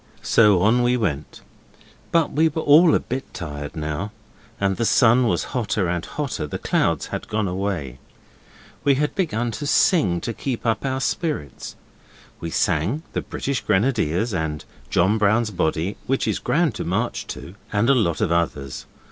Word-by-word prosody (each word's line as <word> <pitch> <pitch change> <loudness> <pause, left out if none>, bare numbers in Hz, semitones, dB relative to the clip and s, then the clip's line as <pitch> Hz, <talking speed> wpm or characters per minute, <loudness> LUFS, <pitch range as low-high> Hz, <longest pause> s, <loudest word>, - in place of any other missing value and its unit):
So 105 -5 +4
on 115 +4 +4
we 125 +1 +2
went 75 - -3 0.7
but 165 -2 +2
we 160 +2 +3
were 160 +1 -3
all 155 +3 +6
a - - +3
bit 130 +2 -5
tired 75 -2 -6
now 80 +6 -3 0.5
and 95 -1 +1
the 120 - 0
sun 120 +1 +4
was - - +1
hotter 105 -6 0
and 85 0 -1
hotter; 140 - -4
the - - -4
clouds - - 0
had - - -4
gone 110 -1 -1
away. 90 -9 -3 0.8
We 140 -1 +4
had 150 +2 0
to - - -30
begin 120 - -1
to 115 +7 -5
sing 145 - +3
to 115 - -3
keep 125 +1 -4
up 110 -1 0
our 130 0 -2
spirits. 145 - -3 0.6
We 85 - -4
sang 90 - 0
'The - - -1
British 140 -1 -3
Grenadiers' 105 - +1
and 80 -4 -3 0.2
'John 100 +5 +2
Brown's 110 +2 +2
Body', 85 +1 -1
which 135 +1 0
is - - 0
grand - - +1
to - - -3
march - - -2
to, 70 +7 -8 0.2
and 105 +2 +1
a 140 - +6
lot 90 - +1
of - - +1
others. 75 -5 -2
105 Hz, 175 wpm, -22 LUFS, 85-130 Hz, 0.8 s, all